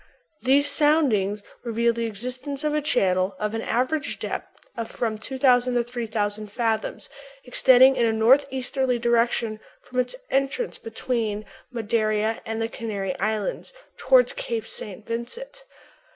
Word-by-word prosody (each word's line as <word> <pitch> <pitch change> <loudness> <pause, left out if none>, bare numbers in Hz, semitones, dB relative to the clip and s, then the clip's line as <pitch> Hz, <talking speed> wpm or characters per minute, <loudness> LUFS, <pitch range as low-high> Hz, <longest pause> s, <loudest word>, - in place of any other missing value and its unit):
"These 275 +3 +4
soundings 265 -10 +2 0.2
reveal 235 0 +1
the 230 0 -2
existence 255 +6 -6
of 300 -1 0
a 300 - +1
channel 190 -9 +1
of 210 0 -2
an 225 - -2
average 275 +6 -1
depth - - -6
of 230 -1 -4
from 220 -2 -2
2000 250 0 +2
to 240 - +3
3000 215 -3 -3
fathoms, 225 -1 -1 0.4
extending 260 +1 +6
in 240 -2 +2
a - - +2
northeasterly 260 +2 +2
direction 235 -2 +1 0.2
from 255 - -4
its 250 - 0 0.2
entrance 275 - -1
between 220 -2 -3 0.3
Madeira 220 -1 0
and 225 0 -3
the 225 - 0
Canary 205 -5 -4
Islands 215 - -2 0.2
toward - - +4
Cape 485 -2 -3
St. 485 +1 -7
Vincent.... 475 - -6
235 Hz, 135 wpm, -24 LUFS, 220-270 Hz, 0.4 s, extending